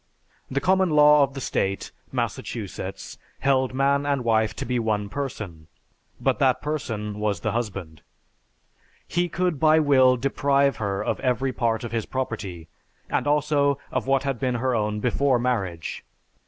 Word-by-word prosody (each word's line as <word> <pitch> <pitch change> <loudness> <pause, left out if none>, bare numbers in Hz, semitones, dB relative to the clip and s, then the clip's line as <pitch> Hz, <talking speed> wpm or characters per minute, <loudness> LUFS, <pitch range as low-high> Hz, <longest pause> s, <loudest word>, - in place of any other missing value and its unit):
The 135 - 0
common 190 +4 +3
law 150 -1 +6
of 140 0 +1
the - - -4
State 95 -5 -2 0.2
[Massachusetts] - - -4 0.2
held 130 -1 +2
man 140 +1 +2
and 140 -3 0
wife 110 -2 +2
to - - -4
be 125 0 0
one 105 -3 -1
person, 105 - -5 0.5
but - - +1
that - - +3
person 110 -9 -4
was 105 -4 -1
the - - -1
husband. 95 -9 -4 1.1
He 175 +1 0
could 180 -4 -1
by 155 +1 +5
will 130 -4 +5
deprive 140 +2 +2
her 100 -2 -2
of - - -1
every 130 +1 0
part 115 -2 0
of 120 - -5
his 115 -2 -2
property, 100 -10 -4 0.4
and - - 0
also 145 -1 +2
of - - -2
what 135 -1 +2
had 135 -4 -2
been 125 -2 0
her 125 +2 0
own 105 -2 -1
before 130 +2 +2
marriage. 100 -9 -2
130 Hz, 155 wpm, -24 LUFS, 105-140 Hz, 1.1 s, law